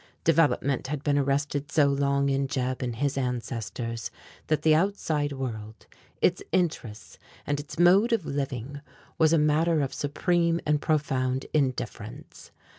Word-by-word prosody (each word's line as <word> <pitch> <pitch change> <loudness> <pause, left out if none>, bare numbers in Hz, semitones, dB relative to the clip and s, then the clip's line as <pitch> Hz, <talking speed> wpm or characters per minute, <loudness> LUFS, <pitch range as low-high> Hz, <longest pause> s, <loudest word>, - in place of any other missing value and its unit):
Development 145 -5 +2
had 145 0 -4
been 145 -1 +2
arrested 145 +1 -1
so 150 -3 +4
long 140 0 +1
in 135 0 +1
Jeb 130 -1 -2
and 120 -2 -3
his 140 +2 -1
ancestors 115 -2 -4 0.4
that 155 - 0
the 155 - +5
outside 155 -4 0
world, 110 -5 -6 0.4
its 175 - +3
interests 125 - -2 0.3
and 145 0 -1
its 145 - -8
mode 190 +7 +5
of 225 -8 +1
living, 140 0 -4 0.4
was 160 -1 +5
a 165 - +5
matter 155 +1 +2
of 135 - -2
supreme 170 +3 +1
and 150 -1 +1
profound 135 -5 0
indifference. 135 -4 -3
145 Hz, 140 wpm, -27 LUFS, 130-155 Hz, 0.4 s, the